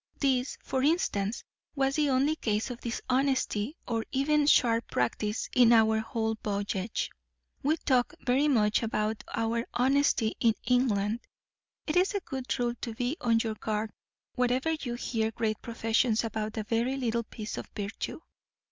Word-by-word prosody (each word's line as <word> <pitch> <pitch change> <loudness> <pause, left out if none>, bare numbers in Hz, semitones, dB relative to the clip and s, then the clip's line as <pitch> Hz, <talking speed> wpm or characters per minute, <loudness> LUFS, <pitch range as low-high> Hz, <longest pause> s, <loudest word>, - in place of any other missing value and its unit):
This, 265 -2 +1
for 260 - -1
instance, 240 - +1 0.3
was 270 -1 +1
the 300 -2 +2
only 275 +4 +2
case 220 -3 -1
of 240 - -8
dishonesty 260 0 0
or 230 -2 -1
even 290 +2 +2
sharp 230 -5 +4
practice 210 - -1
in 245 -2 +7
our 220 -1 +5
whole 220 0 -1
voyage. 200 0 -2 0.5
We 305 +4 +2
talk 250 -5 +1
very 265 +4 +3
much 215 -7 +3
about 215 -1 -1
our 230 +1 0
honesty 260 -3 +2
in 225 -2 +3
England. 225 -4 +2 0.7
It 305 - -2
is 375 +3 +3
a - - +2
good 265 -6 -4
rule 240 -1 0
to 230 -2 -4
be 245 +4 -1
on 230 -2 +3
your 225 -1 -2
guard 215 0 -3 0.4
wherever 250 +5 +1
you 275 -7 -3
hear 225 -2 -1
great 220 -1 -2
professions 225 0 +1
about 220 -1 -3
a 220 - -1
very 235 +5 0
little 235 -3 0
piece 215 -1 -6
of - - -7
virtue. 205 +8 -4
235 Hz, 155 wpm, -29 LUFS, 220-265 Hz, 0.7 s, in